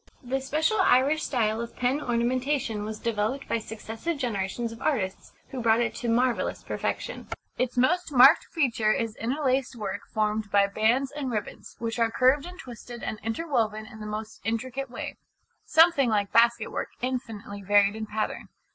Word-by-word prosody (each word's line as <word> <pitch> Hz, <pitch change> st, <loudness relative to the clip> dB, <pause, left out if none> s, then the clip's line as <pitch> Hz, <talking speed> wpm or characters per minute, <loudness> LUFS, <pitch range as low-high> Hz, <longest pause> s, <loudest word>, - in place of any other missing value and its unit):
The 265 Hz, +2 st, -2 dB
special 310 Hz, +10 st, +1 dB
Irish 285 Hz, 0 st, +4 dB
style 225 Hz, -3 st, 0 dB
of 235 Hz, 0 st, -7 dB
pen 255 Hz, +4 st, 0 dB
ornamentation 245 Hz, -2 st, 0 dB
was 215 Hz, +1 st, -5 dB
developed 230 Hz, +4 st, -2 dB
by 230 Hz, -, 0 dB
successive 225 Hz, +8 st, -5 dB
generations 230 Hz, -1 st, -2 dB
of 230 Hz, -, -11 dB
artists, 200 Hz, -11 st, -1 dB, 0.2 s
who 265 Hz, -2 st, -5 dB
brought 225 Hz, 0 st, +4 dB
it 235 Hz, -2 st, 0 dB
to 235 Hz, -, -3 dB
marvellous 245 Hz, +1 st, +1 dB
perfection. -, -, -4 dB, 0.3 s
Its 250 Hz, -1 st, -1 dB
most 340 Hz, +7 st, +2 dB
marked 265 Hz, 0 st, +7 dB
feature 235 Hz, -9 st, +1 dB
is 225 Hz, 0 st, -1 dB
interlaced 260 Hz, +1 st, 0 dB
work 205 Hz, -2 st, -4 dB
formed 215 Hz, -1 st, 0 dB
by 200 Hz, -1 st, +4 dB
bands 225 Hz, +7 st, +1 dB
and 290 Hz, -3 st, -4 dB
ribbons, 215 Hz, -4 st, -5 dB
which 230 Hz, 0 st, -3 dB
are 230 Hz, -1 st, +3 dB
curved 265 Hz, +6 st, +3 dB
and 360 Hz, 0 st, -10 dB
twisted 240 Hz, -, -9 dB
and 215 Hz, -, -4 dB
interwoven 225 Hz, -4 st, -1 dB
in 220 Hz, 0 st, -12 dB
the 210 Hz, -, -6 dB
most 215 Hz, +1 st, -6 dB
intricate 255 Hz, +4 st, -3 dB
way, 240 Hz, -, -6 dB, 0.5 s
something 320 Hz, -6 st, +5 dB
like 205 Hz, -2 st, +1 dB
basket 235 Hz, +1 st, +4 dB
work -, -, -3 dB
infinitely 225 Hz, -5 st, -4 dB
varied 205 Hz, +1 st, +4 dB
in 220 Hz, 0 st, -5 dB
pattern. 215 Hz, +1 st, -3 dB
235 Hz, 165 wpm, -27 LUFS, 215-265 Hz, 0.5 s, marked